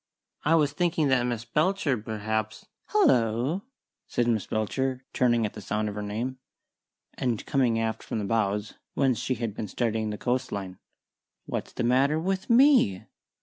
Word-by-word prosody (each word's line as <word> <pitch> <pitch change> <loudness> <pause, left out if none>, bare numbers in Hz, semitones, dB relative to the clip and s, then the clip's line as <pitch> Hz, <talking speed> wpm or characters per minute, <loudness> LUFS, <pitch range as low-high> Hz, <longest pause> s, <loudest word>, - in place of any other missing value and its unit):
"I 160 +2 +4
was 150 -3 +3
thinking 160 -3 +1
that 125 -2 +3
Miss 120 -1 -3
Belcher, 155 +2 +1
perhaps 110 0 -3
" - - -55
"Hallo!" 130 - +3 0.5
said 120 - 0
Miss 110 -4 0
Belcher, 130 +4 -1
turning 120 -3 +3
at 105 - -4
the 105 - -8
sound 105 +2 -1
of - - -5
her 105 - -4
name, 115 +6 -3 0.7
and 120 -4 -2
coming 125 -5 +2
aft 110 -1 -1
from - - -4
the 105 - -2
bows, 105 -1 0 0.2
whence 130 -5 +2
she 130 - -1
had 115 -2 -3
been 105 - -5
studying 110 +1 -1
the 105 - -4
coastline. 100 -8 -2 0.7
"What's - - -4
the - - -2
matter 135 +6 +3
with 190 +3 -2
_me? 245 - +5
120 Hz, 165 wpm, -27 LUFS, 110-135 Hz, 0.7 s, me